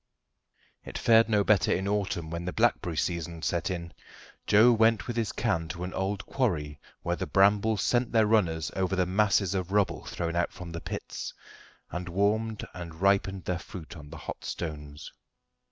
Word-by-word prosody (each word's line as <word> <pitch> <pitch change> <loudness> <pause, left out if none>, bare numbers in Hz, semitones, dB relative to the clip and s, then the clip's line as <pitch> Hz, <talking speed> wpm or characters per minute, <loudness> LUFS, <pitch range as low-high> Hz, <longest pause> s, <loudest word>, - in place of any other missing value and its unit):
It - - -7
fared 115 0 +5
no 105 -2 +3
better 100 -6 +3
in 95 +1 0
autumn, 95 -5 -1
when 85 +1 -4
the 90 - -2
blackberry 100 -7 +1
season 85 -1 -2
set 85 +1 0
in. 85 -3 -4 0.5
Joe 110 +4 +7
went 110 -4 +3
with 120 - -4
his 115 -3 0
can 95 -9 -1
to 85 +3 -5
an 90 - -5
old 95 +1 -2
quarry 75 - -1 0.2
where 85 - 0
the - - -4
brambles 100 +2 +3
sent 120 -1 +1
their 110 -2 +4
runners 90 -8 +1
over 95 0 0
the 90 -1 +2
masses 100 0 +2
of 95 -1 -2
rubble 100 -1 +1
thrown 85 -1 -3
out 85 0 +1
from 90 -2 -9
the 85 0 -5
pits, - - -6 0.6
and 90 +1 -4
warmed 105 +4 0
and 85 -3 -7
ripened 95 -1 +2
their 90 -1 -1
fruit 85 -2 -9
on 75 -3 -11
the - - -9
hot - - -7
stones. 75 -2 -6
95 Hz, 180 wpm, -28 LUFS, 85-105 Hz, 0.6 s, Joe